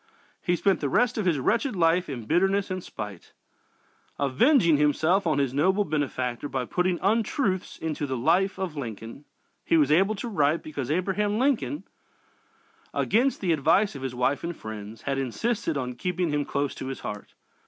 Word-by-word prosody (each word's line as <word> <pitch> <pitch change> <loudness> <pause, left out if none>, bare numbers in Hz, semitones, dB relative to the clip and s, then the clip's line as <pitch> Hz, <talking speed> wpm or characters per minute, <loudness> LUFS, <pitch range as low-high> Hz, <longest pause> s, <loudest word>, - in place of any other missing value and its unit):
He 175 - +1
spent 195 +2 +2
the 140 - -1
rest 245 - +2
of 200 - 0
his 165 -4 +3
wretched 225 - 0
life 175 0 +2
in 120 -5 -5
bitterness 195 - +1
and 185 -1 -3
spite 105 -4 -8 0.8
avenging 165 - +4
himself 160 +6 +2
on 155 -3 +2
his 135 -3 0
noble 190 +8 +2
benefactor 140 -4 -2
by 130 -2 -2
putting 180 +5 0
untruths 210 -1 0
into 155 -2 -3
the 130 -1 -2
"Life 190 +11 +2
of 185 -5 -3
Lincoln" 115 +1 -7 0.4
he 165 - +3
was 150 -2 +3
able 195 +7 +4
to 210 - -5
write 155 -6 +1
because 145 -4 -5
Abraham 195 +5 0
Lincoln, 280 +3 0 1.1
against 255 +5 +2
the 180 -4 +2
advice 165 +8 +3
of 140 - -8
his 130 -2 -4
wife 130 +5 0
and 170 -1 -4
friends, 110 0 -8
had 135 -1 -1
insisted 165 - -1
on 125 -2 -3
keeping 180 +6 -2
him 145 -1 0
close 140 0 -1
to 130 - -7
his 135 - -5
heart. 105 -1 -7
160 Hz, 175 wpm, -26 LUFS, 135-195 Hz, 1.1 s, avenging